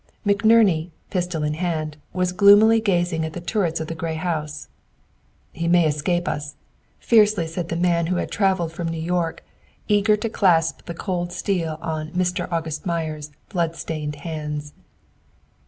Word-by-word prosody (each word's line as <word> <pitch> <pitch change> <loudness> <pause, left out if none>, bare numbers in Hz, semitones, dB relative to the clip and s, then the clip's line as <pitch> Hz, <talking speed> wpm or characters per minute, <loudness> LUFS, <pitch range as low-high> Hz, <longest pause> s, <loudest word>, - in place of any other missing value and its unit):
McNerney, 200 -5 +4 0.2
pistol 175 -4 -1
in 150 0 0
hand, 155 -2 -2 0.2
was 180 0 0
gloomily 205 +3 +6
gazing 175 -5 +1
at 160 0 -4
the 175 - -5
turrets 175 -2 -1
of 160 - -3
the 165 - -5
gray 165 0 -3
house. 155 -3 -3 0.8
"He 170 0 -3
may 175 -1 +5
escape 160 +4 0
us," 145 0 -3 0.4
fiercely 210 -6 +4
said 165 +1 -5
the 165 - -2
man 170 -1 +1
who 180 - 0
had - - -2
traveled 190 -5 +1
from 170 +1 -4
New 165 0 -3
York, 165 0 -2 0.4
eager 210 +1 +3
to 215 - -2
clasp 170 -7 +2
the 170 - -5
cold 175 -1 -3
steel 170 -5 -2
on 155 -2 -3
"Mr. 180 0 -1
August 160 -2 -2
Meyer's" 155 -3 -3 0.2
blood 170 -3 -1
stained 150 -3 -4
hands. 150 -2 -4
170 Hz, 155 wpm, -23 LUFS, 160-185 Hz, 0.8 s, gloomily